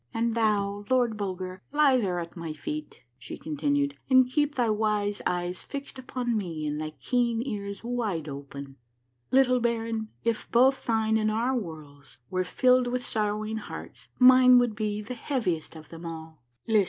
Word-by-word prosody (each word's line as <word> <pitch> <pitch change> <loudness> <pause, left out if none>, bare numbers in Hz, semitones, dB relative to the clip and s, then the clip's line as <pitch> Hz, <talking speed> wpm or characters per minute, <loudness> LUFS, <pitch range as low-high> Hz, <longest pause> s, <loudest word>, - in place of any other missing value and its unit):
" - - -38
And 230 0 +1
thou. 205 -3 +1
Lord 245 -3 +2
Bulger, 185 -2 -4
lie 290 -2 +5
there 185 -7 0
at 170 -1 -7
my 165 -3 -5
feet," 150 -3 -6
she - - -8
continued, 145 -2 -1
" - - -40
and 260 -1 +6
keep 295 +3 0
thy 240 -3 +2
wise 210 -1 0
eyes 180 0 -2
fixed 280 -1 -7
upon 250 -2 -2
me 170 -7 -3
and 150 0 -2
thy 155 0 -5
keen 235 - +1
ears 200 -5 -5
wide 220 -10 -2
open." 140 -1 -8 0.3
" 120 0 -47 0.2
Little 255 -1 +4
baron, 225 -2 -1
if 230 -2 -1
both 260 +3 +4
thine 220 -1 +2
and 215 0 +1
our 235 +5 0
worlds 150 - -7
were 185 0 +1
filled 250 +5 +3
with 250 0 -2
sorrowing 215 0 -1
hearts, 220 - -9
mine 255 0 +8
would 240 -3 +2
be 210 -1 -2
the 225 - -6
heaviest 225 - -2
of 155 -1 -12
them 165 0 -8
all. 160 -2 -8 0.2
List! 220 -2 +4
215 Hz, 180 wpm, -27 LUFS, 165-245 Hz, 0.3 s, mine